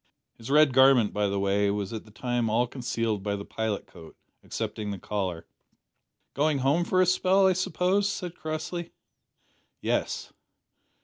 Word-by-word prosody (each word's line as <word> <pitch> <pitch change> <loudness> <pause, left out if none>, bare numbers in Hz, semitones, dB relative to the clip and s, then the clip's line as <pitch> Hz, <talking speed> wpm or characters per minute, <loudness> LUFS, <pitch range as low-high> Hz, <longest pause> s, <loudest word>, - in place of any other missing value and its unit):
His 115 - -9
red 150 -1 +5
garment, 130 -4 +5
by 105 0 +1
the 100 0 -1
way, 100 +1 +2
was 100 0 -2
at 110 - -6
the - - -16
time 120 +1 -1
all 115 +3 +2
concealed 115 -4 -2
by 100 +1 -2
the 100 0 -6
pilot 110 -2 -3
coat, 80 -3 -14 0.3
excepting 105 -1 -4
the 100 - -4
collar. 90 -3 -3 0.9
"Going 150 +1 +1
home 140 +6 +2
for 185 +1 +3
a - - +2
spell, 185 +2 +3
I 190 - +5
suppose?" 185 +2 +1
said 180 -3 -4
Crossley. 170 +1 -5 0.9
"Yes." - - -2
120 Hz, 160 wpm, -27 LUFS, 105-160 Hz, 0.9 s, red